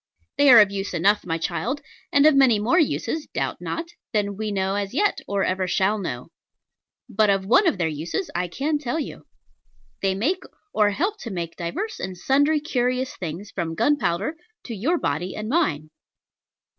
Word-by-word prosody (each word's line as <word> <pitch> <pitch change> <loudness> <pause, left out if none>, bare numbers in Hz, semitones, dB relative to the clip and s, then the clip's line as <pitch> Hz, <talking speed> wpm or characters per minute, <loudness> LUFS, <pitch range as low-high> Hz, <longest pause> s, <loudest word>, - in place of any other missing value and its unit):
They 285 -1 +6
are 240 -3 +10
of 205 -2 +5
use 195 -2 -4
enough, 195 +4 +2
my 165 -1 0
child; 170 - -2 0.3
and 285 +1 +5
of 310 - +7
many 265 -5 +5
more 235 - +2
uses, 315 0 -1
doubt - - -2
not, 330 +1 -4 0.2
than 205 -2 0
we 215 +1 -3
know 190 -1 0
as 200 +3 -3
yet, 410 +6 +1
or 200 -1 0
ever 185 0 0
shall 195 +4 +1
know. 135 -5 -5 0.8
But 215 -3 +2
of 195 -1 +2
one 255 - +4
of 325 - +2
their 170 -2 +1
uses 160 - -3
I 180 +1 -1
can 290 - -1
tell 290 +2 -2
you. 300 - -7 0.7
They 195 -1 +1
make, 330 - 0 0.3
or 210 -1 +4
help 375 - -1
to 235 - -6
make, 170 -4 -4
divers 365 - -4
and 185 -1 -5
sundry 285 - +2
curious 255 -3 -1
things, 180 +4 -6
from 165 -3 -3
gunpowder 230 - +1 0.3
to 235 - -6
your 290 - +1
body 175 - -2
and 215 0 -5
mine. 160 - 0
210 Hz, 180 wpm, -24 LUFS, 185-285 Hz, 0.8 s, are